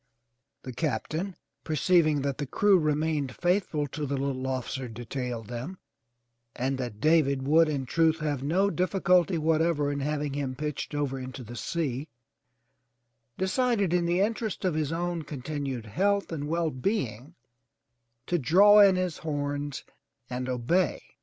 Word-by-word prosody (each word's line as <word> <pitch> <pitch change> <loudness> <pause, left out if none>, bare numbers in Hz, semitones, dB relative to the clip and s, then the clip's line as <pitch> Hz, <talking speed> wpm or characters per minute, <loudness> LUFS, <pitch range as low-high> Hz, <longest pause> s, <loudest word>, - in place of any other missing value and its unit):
The 130 - -7
Captain, 165 +6 -2 0.3
perceiving 155 -1 +2
that 140 0 -2
the 145 - -2
crew 200 - +4
remained 150 -3 0
faithful 175 -4 0
to 150 +1 -4
the 140 +1 -1
little 135 -1 -2
officer 130 0 -3
detailed 120 0 -5
them, 125 - -6 0.8
and 130 +1 -1
that 120 -5 -5
David 145 -3 +3
would 160 +3 +5
in 140 -3 -2
truth 160 +3 +2
have 150 -4 -2
no 185 +8 +2
difficulty 180 -1 +2
whatever 160 -2 +1
in 140 - -2
having 145 0 -2
him 140 -2 -3
pitched 150 +1 -4
over 140 -2 -1
into 130 0 -7
the 120 +1 -9
sea, 145 0 -2 1.3
de 190 - 0
cided 215 -5 +1
in 175 -1 +2
the 175 +2 +2
interests 215 -1 -1
of 180 - +2
his 155 -1 -1
own 175 0 -2
continued 140 -4 -5
health 200 - 0
and 145 -3 -3
well 165 0 0
being 130 - -3 0.9
to 175 - 0
draw 200 +9 +6
in 200 -2 +7
his 185 -3 -2
horns 145 -2 -3 0.5
and 125 +1 -3
obey. 130 +8 +1
150 Hz, 145 wpm, -28 LUFS, 135-175 Hz, 1.3 s, in